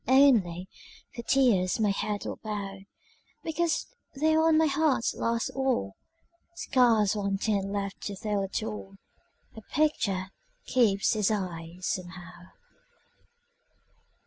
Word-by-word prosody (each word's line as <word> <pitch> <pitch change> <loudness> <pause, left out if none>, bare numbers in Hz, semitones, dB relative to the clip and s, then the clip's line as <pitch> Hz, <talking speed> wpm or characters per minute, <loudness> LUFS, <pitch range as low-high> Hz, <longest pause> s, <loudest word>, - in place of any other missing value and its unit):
Only, 225 -10 +4 0.5
for 235 - -6
tears 230 -8 +2
my 210 -2 +3
head 205 +1 -2
will - - -4
bow, 200 -2 -4 0.6
Because 330 0 0 0.3
there 315 +3 +3
on 320 -1 +4
my 320 - +4
heart's 290 -4 +1
last 230 0 -1
wall, 260 - 0 0.6
Scarce 230 - +3
one 200 -1 -1
tint 200 -1 -1
left 200 -1 -3
to 200 - -5
tell 205 +1 -1
it 195 +3 -3
all, 210 -3 -6 0.6
A 220 - -9
picture 200 -9 0 0.3
keeps 220 -5 +2
its 210 -2 +2
eyes, 180 -3 -4
somehow. 180 -1 -5
210 Hz, 120 wpm, -28 LUFS, 195-260 Hz, 0.6 s, Only